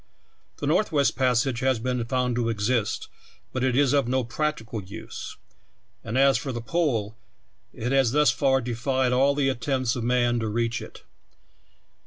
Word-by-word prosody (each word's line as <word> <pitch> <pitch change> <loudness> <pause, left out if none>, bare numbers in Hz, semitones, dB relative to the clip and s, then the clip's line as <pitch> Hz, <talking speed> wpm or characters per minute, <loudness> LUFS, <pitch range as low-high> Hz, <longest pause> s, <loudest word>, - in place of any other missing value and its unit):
The - - -4
Northwest 155 -3 +2
Passage 130 -1 +1
has 130 -1 +2
been 125 +1 -2
found 125 0 0
to 120 -1 0
exist, 110 0 -1 0.5
but 130 - -1
it 130 -2 +1
is 140 -2 +3
of 140 -4 +2
no 130 +1 +1
practical 120 -3 -3
use; 100 +4 -8 0.7
and 115 - -3
as 135 0 +4
for 135 - -4
the 120 - -4
Pole, 115 -6 -1 0.6
it 125 +3 -4
has 135 -4 +3
thus 150 -1 +4
far 135 +2 +2
defied 125 +2 0
all 135 +2 +3
the 140 -2 +1
attempts 130 -1 -1
of 120 - -3
man 120 0 +2
to 110 - -2
reach 115 +2 -1
it. - - -11
125 Hz, 165 wpm, -25 LUFS, 115-135 Hz, 0.7 s, as